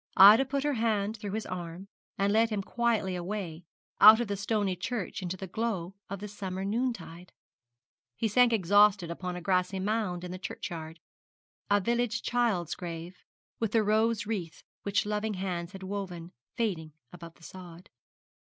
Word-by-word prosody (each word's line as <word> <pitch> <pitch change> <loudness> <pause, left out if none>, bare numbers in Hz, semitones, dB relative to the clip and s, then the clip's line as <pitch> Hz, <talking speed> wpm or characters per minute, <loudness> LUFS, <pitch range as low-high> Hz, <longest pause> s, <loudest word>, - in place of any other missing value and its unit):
Ida 210 +7 +9
put 275 +1 -2
her 295 0 +1
hand 220 -3 0
through 205 -2 -6
his 220 0 -3
arm, 175 +1 -6 0.3
and 200 +1 +2
led 225 +1 +4
him 210 -3 -2
quietly 225 -5 0
away, 175 -2 -5 0.3
out 220 +2 +10
of 240 - -1
the 200 - -2
stony 205 -1 0
church 210 +2 -4
into 180 0 -4
the 190 - -6
glow 190 -2 -3 0.2
of 200 0 -5
the 210 - -5
summer 190 -2 -5
noontide. 200 -6 -3 0.8
He 225 - 0
sank 245 +3 +4
exhausted 205 -3 +4
upon 180 +1 -4
a 180 - -6
grassy 185 +1 0
mound 195 -3 -1
in 180 - -6
the 185 - -6
churchyard 165 -3 -6 0.7
a 205 0 +4
village 235 +2 0
child's 230 -9 0
grave, 170 0 -7 0.4
with 225 -3 -1
the 225 -2 +4
rose 220 +1 +2
wreath 190 -7 -4 0.2
which 200 0 0
loving 210 0 -1
hands 180 -1 -4
had 190 0 -9
woven 185 -3 -5 0.2
fading 170 -9 -2 0.2
above 170 -2 -10
the 165 - -21
sod. 180 -1 -11
200 Hz, 165 wpm, -29 LUFS, 180-220 Hz, 0.8 s, out